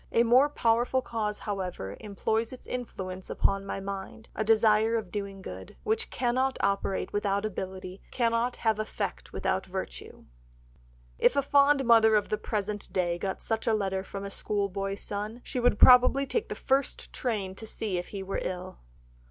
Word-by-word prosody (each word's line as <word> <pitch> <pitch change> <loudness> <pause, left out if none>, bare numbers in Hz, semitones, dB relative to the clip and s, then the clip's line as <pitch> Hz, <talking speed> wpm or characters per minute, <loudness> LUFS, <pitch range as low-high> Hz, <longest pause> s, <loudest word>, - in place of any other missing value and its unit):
A 235 - +4
more 250 +5 +5
powerful 240 0 +2
cause, 215 -3 -2
however, 180 - -4
employs 220 +2 -1
its 255 - -10
influence 190 -7 -5
upon 195 0 0
my 195 - -3
mind, 195 +3 -7
a - - -1
desire 220 0 +4
of 215 -6 -3
doing 200 -2 -5
good, 95 - -8
which 220 +1 0
cannot 260 +2 0
operate 200 -1 0
without 200 0 0
ability, 190 -2 -5
cannot 235 0 +1
have 220 -2 0
effect - - -4
without - - -1
virtue." - - -7 0.9
If - - +4
a 280 - +2
fond 280 0 +4
mother 225 -2 +6
of 210 - +1
the 215 - -1
present 210 -1 -3
day 175 -2 0
got 190 +1 -3
such 225 0 -2
a 225 - +4
letter 190 -2 -1
from 195 0 -7
a 200 - -6
schoolboy 195 -1 -1
son 210 +3 -5
she 255 - -3
would 245 -3 +3
probably 255 +3 +7
take 430 - -2
the - - -3
first 270 +1 -1
train 210 -7 -2
to 220 +3 -9
see 205 -5 -3
if 175 - -6
he 195 -2 -6
were 195 +1 -2
ill! 185 0 -5
210 Hz, 170 wpm, -28 LUFS, 195-235 Hz, 0.9 s, probably